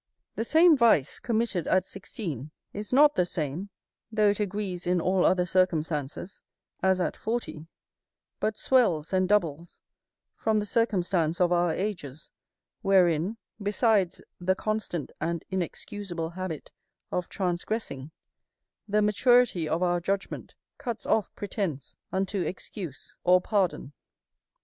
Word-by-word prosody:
The - - -2
same 320 +6 +6
vice, 230 - +3
committed 220 -7 -1
at 185 0 +3
sixteen, 165 - -6 0.2
is 205 +1 -6
not 295 +3 +6
the 180 - +2
same, 170 +2 -3 0.4
though 215 -1 +4
it 205 - 0
agrees 195 -3 -3
in 180 0 +3
all 185 +2 +2
other 180 -1 +3
circumstances, 165 -2 -1 0.4
as 190 -1 +3
at 180 - -1
forty; 220 -9 -4 0.7
but 215 0 -1
swells 190 - +2
and 185 -1 +2
doubles 170 -5 0 0.6
from 220 -1 +1
the 210 - -2
circumstance 180 -7 +1
of 180 -1 +3
our 175 -1 +3
ages, 160 -7 -4 0.5
wherein, 185 0 +3 0.2
besides 205 -2 +2 0.2
the 185 +1 +1
constant 215 -7 -3
and 170 +1 -2
inexcusable 180 -1 -4
habit 180 -4 -6 0.4
of 180 -1 -2
transgressing, 175 - -3 0.8
the 210 0 +2
maturity 210 -5 +3
of 170 +3 0
our 175 -1 +2
judgment 195 +3 -3 0.2
cuts 235 -3 -4
off 215 - +1
pretence 190 - -4 0.2
unto 190 +1 -1
excuse 175 - -6
or 180 +1 +6
pardon. 180 -7 -1
185 Hz, 125 wpm, -28 LUFS, 170-210 Hz, 0.8 s, same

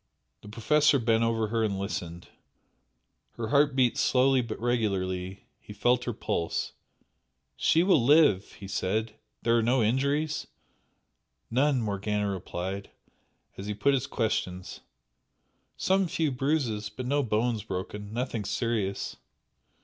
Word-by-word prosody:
The 105 - -12
Professor 145 +7 +3
bent 115 -2 +2
over 115 -2 0
her 115 0 0
and 100 -3 0
listened, 90 -3 -5 1.1
her 115 -2 -4
heart 140 0 +3
beat 125 -3 +2
slowly 130 0 +3
but 115 -2 -6
regularly, 95 -6 -1
he 105 - -11
felt 120 +4 +2
her 120 - -1
pulse. 85 -4 -2 0.8
"She 165 +2 +3
will 180 -9 +4
live!" 140 - +4
he 100 - -10
said 105 +3 -1 0.3
"There 115 0 +3
are 115 - +4
no 120 +1 +2
injuries?" 140 +6 0 1.0
"None" 130 0 +2
Morgana 105 0 -1
replied, 95 +1 -5 0.7
as 100 - -6
he 105 - -3
put 140 +8 +2
his 135 0 0
questions 95 -5 -2 1.0
"Some 190 0 +2
few 160 -2 0
bruises 130 -6 -1
but 125 +4 -7
no 145 +3 +1
bones 115 -1 0
broken 100 +2 -6
nothing 115 -2 -2
serious." 110 -3 -2
115 Hz, 130 wpm, -28 LUFS, 100-130 Hz, 1.1 s, will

